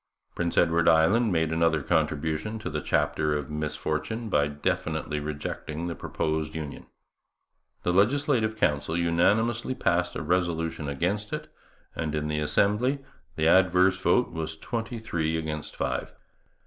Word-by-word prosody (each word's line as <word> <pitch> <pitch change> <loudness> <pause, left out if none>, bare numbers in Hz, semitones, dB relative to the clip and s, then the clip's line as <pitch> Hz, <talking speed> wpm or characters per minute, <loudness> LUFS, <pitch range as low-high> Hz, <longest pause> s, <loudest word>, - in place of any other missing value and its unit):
Prince 85 -1 -2
Edward 85 0 +3
Island 95 +8 +4
made 80 -2 +1
another 80 -2 +2
contribution 80 +6 0
to 110 - -5
the 75 0 -2
chapter 75 +2 +1
of 75 0 -6
misfortune 75 +9 -3
by 75 -6 +3
definitely 75 +1 -2
rejecting 75 +2 -4
the 85 - -2
proposed 80 -1 -2
union. 75 -3 -6 1.0
The 90 - +1
Legislative 115 +1 +2
Council 80 -2 +1
unanimously 105 +9 +2
passed 90 -5 +1
a - - -3
resolution 80 -3 -1
against 95 +9 -1
it, - - -5 0.4
and 75 -1 -2
in 75 0 -2
the 75 0 0
Assembly 115 - +1 0.3
the 80 0 +1
adverse 90 +1 +5
vote 95 +8 +3
was 80 -1 -4
twenty 115 +6 -4
three 80 -7 -1
against 75 -1 -4
five. - - -2
80 Hz, 135 wpm, -27 LUFS, 75-105 Hz, 1.0 s, adverse